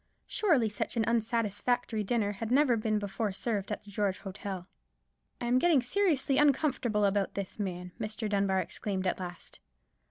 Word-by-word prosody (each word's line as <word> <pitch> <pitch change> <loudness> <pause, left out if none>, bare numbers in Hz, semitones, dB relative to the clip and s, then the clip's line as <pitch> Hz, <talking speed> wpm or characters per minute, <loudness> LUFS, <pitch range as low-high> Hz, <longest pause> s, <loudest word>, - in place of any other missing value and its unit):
Surely 315 - +2
such 210 +3 -3
an 225 - +3
unsatisfactory 230 0 0
dinner 205 -1 +1
had 215 +2 -5
never 260 -1 +4
before 215 -1 -1
been 200 - -4
served 210 -2 -2
at 210 - -3
the 205 - -13
George 200 -2 0
Hotel. 195 -2 -6 0.7
"I - - -3
am 245 +1 +3
getting 310 -5 +4
seriously 290 -3 +2
uncomfortable 265 -7 +2
about 200 0 +1
this 200 +1 -5
man," 180 -2 -4
Mr. 215 0 -3
Dunbar 200 -2 +1
exclaimed 190 +2 -3
at 185 - 0
last. 175 -1 -8
215 Hz, 160 wpm, -30 LUFS, 200-245 Hz, 0.7 s, never